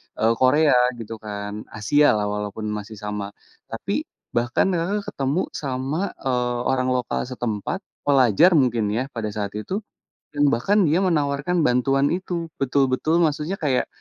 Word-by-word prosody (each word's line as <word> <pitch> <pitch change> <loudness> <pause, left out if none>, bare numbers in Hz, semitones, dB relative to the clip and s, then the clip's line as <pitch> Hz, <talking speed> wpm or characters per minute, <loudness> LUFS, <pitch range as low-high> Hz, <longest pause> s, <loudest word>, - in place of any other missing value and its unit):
e - - -4 0.2
Korea 145 +4 +4 0.3
gitu 115 0 -7
kan, 105 0 -6
Asia 110 +5 +4
lah 105 -1 0
walaupun 105 +1 -4
masih 105 +1 -6
sama. 105 -1 -4 0.4
Tapi, - - -3 0.2
bahkan 120 +8 +1
Kakak 190 +4 -1
ketemu 140 +6 -1
sama, 140 +6 -3
eee, 125 -2 0
orang 130 -1 +1
lokal 125 0 -2
setempat, 120 - -3 0.3
pelajar 135 - +5
mungkin 120 -7 +2
ya, 125 +5 -2
pada 115 -4 -4
saat 100 -2 -2
itu, 195 - -4 0.5
dan 145 -1 +3
bahkan 200 - +2
dia 160 +5 +3
menawarkan 155 -1 +1
bantuan 135 +2 +2
itu, 175 -2 -3
betul-betul 135 +5 +2
maksudnya 155 +3 0
kayak, 135 -4 +1
130 Hz, 140 wpm, -23 LUFS, 110-155 Hz, 0.5 s, pelajar